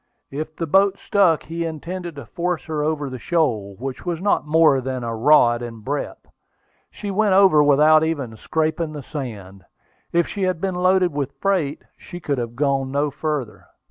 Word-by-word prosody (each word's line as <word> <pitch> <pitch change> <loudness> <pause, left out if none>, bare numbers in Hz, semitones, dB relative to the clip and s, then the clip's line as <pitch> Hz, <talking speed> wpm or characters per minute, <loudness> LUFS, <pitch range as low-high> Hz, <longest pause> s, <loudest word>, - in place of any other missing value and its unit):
If 155 +3 -5
the 165 - -3
boat 195 +4 +3
stuck, 190 -6 +2
he 165 +1 -4
intended 170 +1 -5
to 140 -4 -8
force 175 +7 -3
her 155 -2 -3
over 150 -2 -1
the 130 -1 -7
shoal, 115 - 0
which 130 +2 -6
was 175 -3 -3
not 195 -5 0
more 155 -3 +4
than 130 -1 -4
a 115 -1 -3
rod 120 -1 +4
in 115 -2 -7
breadth. 140 +6 -4 0.6
She 205 - -6
went 200 -1 +2
over 190 -6 +6
without 150 +2 +5
even 140 -8 -2
scraping 160 +4 -2
the 145 -2 -7
sand. 105 - -7 0.5
If 170 0 +2
she 205 - -6
had 185 -3 0
been 190 +1 -2
loaded 180 -1 +2
with 140 -1 -4
freight, 175 -7 0
she 175 - -10
could 145 -5 -2
have 120 -1 -5
gone 135 -1 0
no 145 +2 0
farther. 145 -6 -4
150 Hz, 180 wpm, -21 LUFS, 135-170 Hz, 0.6 s, over